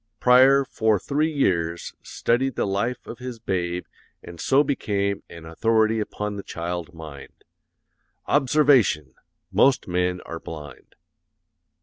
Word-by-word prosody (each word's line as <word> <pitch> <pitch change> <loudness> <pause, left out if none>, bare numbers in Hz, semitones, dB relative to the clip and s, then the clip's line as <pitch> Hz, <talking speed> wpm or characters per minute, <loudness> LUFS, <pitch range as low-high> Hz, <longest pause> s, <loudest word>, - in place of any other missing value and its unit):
Preyer 130 +2 +6
for 110 -4 +1
three 150 - -1
years 85 - -1
studied 130 +1 -1
the - - 0
life 105 +5 -2
of 120 - -9
his 125 -1 -6
babe 90 -5 -2 0.4
and 85 -1 -11
so 140 +2 +4
became 100 -8 -1
an 85 -1 -11
authority 110 +6 +1
upon 105 -1 -4
the - - -4
child 85 -1 -5
mind. 80 -4 -11 0.8
Observation! 130 - +3 0.4
Most 135 -2 +3
men 90 0 0
are 85 - -7
blind. 75 -4 -10
105 Hz, 120 wpm, -24 LUFS, 85-125 Hz, 0.8 s, Preyer